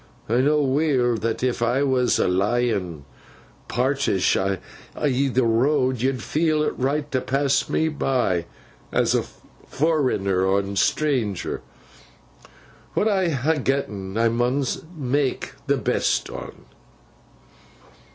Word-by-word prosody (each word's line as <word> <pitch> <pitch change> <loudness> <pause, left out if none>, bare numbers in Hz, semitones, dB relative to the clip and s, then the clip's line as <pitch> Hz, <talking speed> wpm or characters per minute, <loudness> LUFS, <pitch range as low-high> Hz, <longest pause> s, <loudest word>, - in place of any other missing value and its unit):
I 115 - +1
know 150 +2 +3
weel 135 -3 +2
that 115 +2 -2
if 125 -2 0
I 120 +4 +2
was 130 -3 +2
a - - +2
lyin 95 - 0 0.6
parisht 130 -6 +1
i' 95 0 0 0.4
th' 135 -2 0
road, 130 +2 +2
yo'd 130 -2 0
feel 155 -1 +1
it - - 0
right 145 +3 -1
to 130 - 0
pass 135 +1 +1
me 160 - +1
by, 125 - 0 0.4
as - - +2
a - - +2 0.4
forrenner 100 - +1
and 100 0 -2
stranger. 125 - 0 1.3
What 215 - +2
I 190 -4 +2
ha 145 +1 +1
getn, 110 -8 -2
I 115 0 +3
mun 125 +4 0 0.3
mak 135 -1 -1 0.2
th' - - +1
best - - 0
on. - - -9
130 Hz, 120 wpm, -23 LUFS, 115-145 Hz, 1.3 s, know